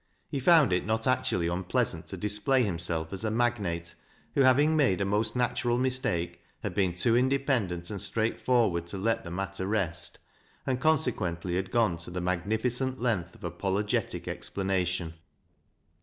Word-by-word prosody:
He 140 - -2
found 150 - +5
it 90 - +1
not 110 +2 -1
actually 105 -9 +1
un 90 +2 -2
pleasant 90 - -1
to - - -6
display 105 +6 +2
himself 85 -4 -2
as 95 - -5
a 110 - 0
magnate, 105 -8 -1 0.4
who, 140 - +3
having 140 +4 +5
made 135 - +3
a 100 - +1
most 105 +4 0
natural 120 0 +1
mistake, 90 -10 0 0.2
had 100 - -3
been 95 -2 +1
too 115 +6 +2
independent 125 -9 +1
and 100 -3 -3
straightforward 110 -5 +1
to 90 - -5
let 115 +4 0
the 85 - -7
matter 95 +1 -3
rest, 95 -6 -1 0.5
and 130 -1 -1
conse 155 -5 +3
quently 85 -2 -3
had 95 0 -1
gone 110 -8 +2
to 85 - -6
the 90 +1 -4
magnificent 110 +9 -1
length 100 -8 -1
of - - -17
apologetia 95 +4 -1
explanation. 90 -3 -2
100 Hz, 160 wpm, -29 LUFS, 90-125 Hz, 0.5 s, found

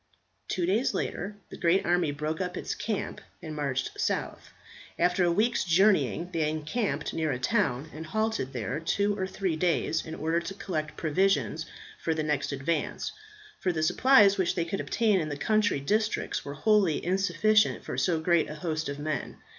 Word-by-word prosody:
Two 180 - -1
days 210 +8 +1
later 200 +3 -3 0.2
the - - -8
great 175 +2 +2
army 175 -2 +2
broke 155 +4 -3
up 180 -1 -3
its - - -3
camp 215 -3 -3 0.2
and 155 -3 -7
marched 140 -3 -2
south. - - -2 0.5
After 180 +1 +2
a 175 - +3
week's 220 +7 +2
journeying 175 - +3
they 155 -2 +1
encamped 155 0 -2
near 160 -2 0
a 125 - -1
town, 145 - 0
and 160 +1 -7
halted 220 -8 -1
there 120 +1 -3
two 200 +5 0
or 190 -2 -2
three 190 -3 -2
days 165 -1 +1
in 160 - -7
order 160 +2 0
to 170 +3 -6
collect 155 -6 -4
provisions 165 0 +1 0.3
for 160 - 0
the 155 - -1
next 150 -2 -1
advance; 145 +3 -2 0.5
for 185 - +1
the 160 -2 -1
supplies 205 +1 +5
which 185 - +1
they 170 - 0
could 185 +4 -3
obtain 215 -4 +2
in 155 -2 -2
the 145 - -4
country 215 -1 +2
districts 215 +10 0
were 140 0 -6
wholly 195 -2 +2
insufficient 195 +3 +2
for - - -4
so 170 -3 +1
great 170 0 +2
a 150 - -6
host 155 -1 -3
of 140 - -4
men. 150 +1 -3
170 Hz, 180 wpm, -28 LUFS, 155-195 Hz, 0.5 s, supplies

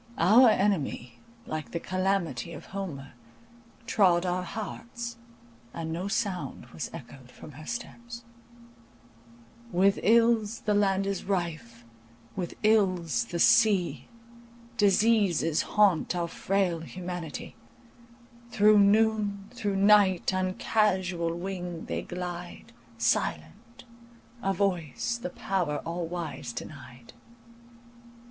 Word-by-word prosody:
Our 225 +9 +7
enemy, 190 - 0 0.3
like 155 -1 -5
the 170 - -1
Calamity 185 -6 -1
of 150 - -9
Homer, 150 -10 -6 0.7
trod 185 -6 +3
our 180 0 0
hearts, 230 +5 -6 0.6
and 160 -1 -4
no 180 +4 -3
sound 200 - -3
was - - -5
echoed 130 -2 -11
from 150 - -12
her 150 +3 -12
steps— 235 0 -7 1.5
With 195 +3 +3
ills 230 0 +3
the 210 - 0
land 195 -1 +2
is 195 -1 -3
rife, 155 - -3 0.5
with 175 -2 -4
ills 185 - +2
the 175 - -5
sea, 205 -1 +3 0.7
Diseases 205 -6 +3
haunt 195 -4 +2
our 170 -1 -1
frail 185 -1 0
humanity, 175 -2 -7 0.9
Through 215 -2 +5
noon, 205 -1 +2
through 205 -5 -2
night, 195 -2 +4
on 185 0 -1
casual 185 -6 0
wing 175 -2 -5
they - - -3
glide, 175 -1 -7 0.2
Silent,—a 235 - -3
voice 190 - -1
the 180 - -4
power 175 -5 -2
all 170 0 -3
wise 160 -8 -5
denied. 125 -2 -10
185 Hz, 105 wpm, -28 LUFS, 170-210 Hz, 1.5 s, Our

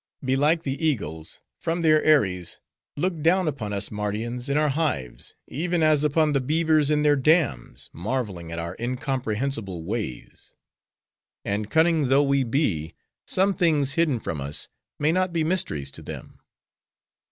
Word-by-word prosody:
Belike, 145 +5 +2
the 140 +2 -3
eagles, 80 - -2 0.2
from 170 +1 -2
their 155 -1 +4
eyries 95 - +2 0.4
look 170 0 -1
down 175 +3 +3
upon 125 -9 -3
us 100 0 -1
Mardians, 110 +5 -3
in 140 - +1
our 150 0 +3
hives, 135 - -1
even 170 +3 -1
as 155 -2 +4
upon 150 0 +2
the 140 - +2
beavers 155 +1 +2
in 150 -1 +2
their 145 -1 +5
dams, 145 - +1
marveling 95 -4 -3
at 85 - -5
our 85 0 -4
incomprehensible 120 - -2
ways. 100 - -6 0.9
And 105 +1 -2
cunning 160 -3 +3
though 135 +3 +4
we 140 -1 +2
be, 105 - -1 0.3
some 195 +2 +2
things, 150 -7 +2
hidden 150 -5 +1
from 80 -8 -4
us, 70 +2 -3 0.3
may 150 +2 +2
not 185 +1 +1
be 165 -2 +1
mysteries 75 - -1
to - - -11
them. - - -9
140 Hz, 150 wpm, -25 LUFS, 105-155 Hz, 0.9 s, their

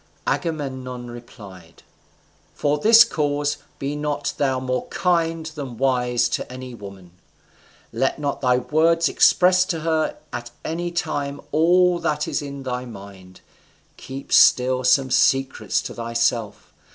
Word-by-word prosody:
Agamemnon 130 -6 -4
replied, 100 -8 -13 0.7
"For 145 0 0
this 225 +6 +8
cause 145 -7 -1 0.2
be 140 +2 -4
not 150 -1 -3
thou 135 -3 0
more 130 -1 -3
kind 165 -2 0
than 145 -6 -7
wise 125 -2 +1
to - - -4
any 130 0 -8
woman. 100 -5 -11 0.8
Let 135 - 0
not 145 -1 -3
thy 125 -2 +3
words 165 +6 +2
express 185 0 +4
to 165 -4 -3
her 160 -1 -1 0.2
at 120 0 -5 0.2
any 175 +2 -3
time 145 -5 -3
all 175 +2 +3
that 150 -2 -1
is - - -2
in 140 -1 -7
thy 125 -1 -3
mind, 100 -4 -12 0.5
keep 135 +1 -8
still 130 0 +5
some 130 +1 +3
secrets 135 +1 +1
to - - -6
thyself. 115 -2 -2
135 Hz, 130 wpm, -22 LUFS, 125-155 Hz, 0.8 s, this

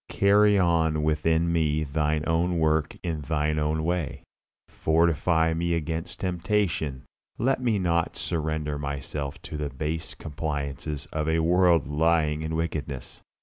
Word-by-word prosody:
Carry 105 +1 +4
on 80 -4 +2
within 80 +2 +1
me 80 -2 +1
Thine 75 +1 0
own 85 +2 +1
work 80 -1 +1
in 80 -3 -2
Thine 75 +1 0
own 75 +1 0
way. 85 -3 -2 0.4
Fortify 80 0 +2
me 85 +1 0
against 80 0 -4
temptation; 90 -6 -1 0.3
let 130 +2 +1
me 115 -4 +2
not 85 -3 0
surrender 80 -2 -2
myself 70 0 -4
to 75 - -6
the 75 -1 -2
base 75 +4 -4
compliances 75 -1 -4
of 75 0 -1
a 80 - +2
world 85 -1 +4
lying 75 0 +2
in 80 0 -3
wickedness. 75 -5 -4
80 Hz, 135 wpm, -26 LUFS, 75-85 Hz, 0.4 s, Carry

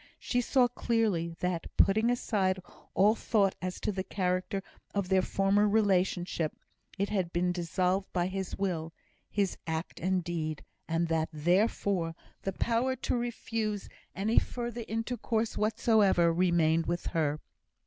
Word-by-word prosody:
She 245 - 0
saw 250 0 +3
clearly, 215 -9 0
that, 180 -2 -1
putting 220 +4 +4
aside 195 -6 +1 0.4
all 205 +3 +5
thought 205 -4 +2
as 185 0 -3
to - - 0
the 190 -1 -3
character 185 0 -1 0.3
of 200 -2 -1
their 190 -1 +4
former 195 +2 +2
relationship, 185 -6 +1 0.4
it 200 +1 0
had 190 -5 -1
been 180 +1 +1
dissolved 180 +2 0
by 175 -1 +1
his 190 0 -4
will 165 -5 -2 0.4
his 200 -3 -1
act 160 +1 -3
and 185 +1 0
deed; 160 -3 -3 0.2
and 165 +1 0
that, 160 -1 +1
therefore, 175 +1 +1 0.3
the 195 - -3
power 240 +6 +1
to - - -1
refuse 225 -3 -2 0.3
any 215 +4 +3
further 240 -1 -5
intercourse 225 0 -1
whatsoever 210 -5 +3
remained 165 -2 +2
with 175 0 -2
her. 155 -2 +1
190 Hz, 140 wpm, -30 LUFS, 175-215 Hz, 0.4 s, all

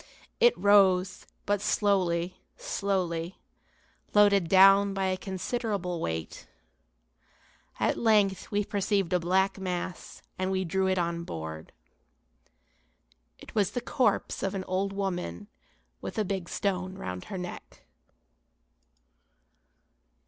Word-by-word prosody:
It 480 0 +5
rose, 190 -2 +3 0.2
but 205 -1 0
slowly, 185 -4 0 0.2
slowly, 190 - -2 0.8
loaded 200 -4 +5
down 195 +1 +6
by 195 0 0
a 185 0 +1
considerable 190 -2 -3
weight. 80 0 -4 1.3
At - - +1
length 210 -4 +2
we 205 -1 0
perceived 200 -3 0
a 180 - +3
black 190 +3 +1
mass 180 -1 -5 0.2
and 185 0 0
we 190 0 -1
drew 190 +2 0
it 190 0 +1
on 170 -1 -1
board. 80 - -7 1.7
It - - -13
was 205 -2 +1
the - - -1
corpse 250 +1 0
of 195 0 -2
an 190 - -3
old 190 +2 -1
women 180 - -4 0.5
with - - -6
a 215 - +1
big 190 -2 -3
stone 185 -1 -2
round 90 - -6
her 195 - -6
neck. 180 -1 -8
190 Hz, 115 wpm, -28 LUFS, 180-200 Hz, 1.7 s, down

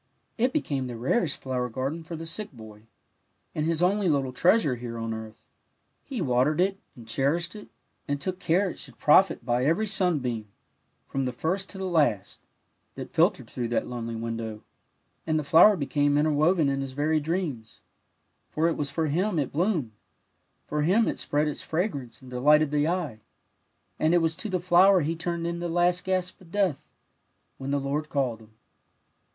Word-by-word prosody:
It 250 +2 +1
became 140 - -1
the 120 - -6
rarest 145 - 0
flower 125 -2 -2
garden 135 +7 -3
for 165 +1 -7
the 165 +1 -7
sick 205 +5 -4
boy, 110 -3 -13 0.7
and 155 0 -1
his 165 +1 +1
only 195 +1 +2
little 135 -4 0
treasure 175 - +3
here 120 -1 -6
on 115 0 -3
earth; 110 0 -8 0.7
he 255 -9 -4
watered 130 +3 +2
it, 195 +2 +1 0.2
and 115 -2 -13
cherished 160 - 0
it, 210 - -10 0.4
and 145 0 -1
took 185 +5 -4
care 185 +5 +2
it 180 - -6
should - - -8
profit 150 -4 +4
by 120 0 +1
every 165 +10 +2
sunbeam, 150 - 0 0.6
from 135 -1 -2
the 125 - -1
first 185 +10 -2
to 195 - -9
the 190 - -4
last, 145 - +1 0.5
that - - -8
filtered - - +2
through 120 -2 -4
that 115 - 0
lonely 115 -2 -5
window, 115 -1 -5 0.6
and 155 -1 +2
the 155 - -1
flower 175 +8 +6
became 145 -1 +1
interwoven 155 +2 +3
in 135 0 0
his 135 -1 -5
very 155 +3 +1
dreams; 150 - -4 0.7
for 160 +2 +1
it 170 - 0
was 145 -1 -2
for 160 +2 -1
him 175 +6 0
it 145 -4 -1
bloomed; 165 - 0 0.7
for 150 0 -2
him 195 +9 +3
it - - -2
spread 150 +1 0
its 150 - -4
fragrance 155 - -3
and 125 - -12
delighted 150 +4 +4
the 150 0 +2
eye, 165 -10 -2 0.8
and 160 +2 +3
it - - +5
was 165 -1 0
to 215 - -4
the 185 -1 0
flower 185 +2 +5
he 160 +3 -1
turned 170 0 -3
in 170 0 -2
the 175 0 -3
last 175 +1 +2
gasp 185 -1 -2
of 170 -3 -17
death, 190 -8 0 0.7
when 135 0 -5
the 140 0 +1
Lord 145 +3 -2
called 130 -6 -1
him. 110 0 -18
150 Hz, 185 wpm, -27 LUFS, 130-175 Hz, 0.8 s, flower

